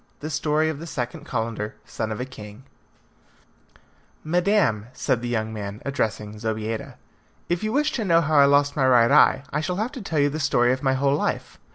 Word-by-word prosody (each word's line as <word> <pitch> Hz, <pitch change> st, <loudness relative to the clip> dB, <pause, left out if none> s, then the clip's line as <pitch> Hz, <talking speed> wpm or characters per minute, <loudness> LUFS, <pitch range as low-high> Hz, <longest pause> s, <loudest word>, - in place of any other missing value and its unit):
The 155 Hz, +2 st, -5 dB
Story 150 Hz, +2 st, +1 dB
of 160 Hz, -2 st, -3 dB
the 165 Hz, -, -8 dB
Second 125 Hz, -6 st, -5 dB
Calendar, 110 Hz, -3 st, -3 dB
Son 110 Hz, -1 st, -4 dB
of 110 Hz, -, -4 dB
a 125 Hz, -, -2 dB
King 105 Hz, -2 st, -11 dB, 1.6 s
"Madam," 170 Hz, -, +1 dB
said 125 Hz, -2 st, -1 dB
the 120 Hz, -, -4 dB
young 110 Hz, -2 st, -2 dB
man, 100 Hz, -1 st, -6 dB
addressing 110 Hz, -6 st, -2 dB
Zobeida, 110 Hz, 0 st, -3 dB, 0.5 s
"if 175 Hz, +2 st, -1 dB
you 215 Hz, -, -1 dB
wish 300 Hz, +4 st, +1 dB
to 230 Hz, -, -2 dB
know 165 Hz, -3 st, +4 dB
how 155 Hz, -2 st, +2 dB
I 140 Hz, -, +8 dB
lost 145 Hz, 0 st, +3 dB
my 135 Hz, -3 st, +2 dB
right 120 Hz, -2 st, +5 dB
eye, 135 Hz, -, +5 dB
I 150 Hz, -, 0 dB
shall 180 Hz, +3 st, -2 dB
have 220 Hz, +6 st, -2 dB
to 260 Hz, -, -8 dB
tell 165 Hz, -5 st, -3 dB
you 145 Hz, 0 st, +3 dB
the 155 Hz, +2 st, -4 dB
story 125 Hz, -4 st, +3 dB
of 130 Hz, -, -4 dB
my 135 Hz, -2 st, +2 dB
whole 140 Hz, +1 st, +2 dB
life." -, -, -3 dB
135 Hz, 205 wpm, -24 LUFS, 115-155 Hz, 1.6 s, I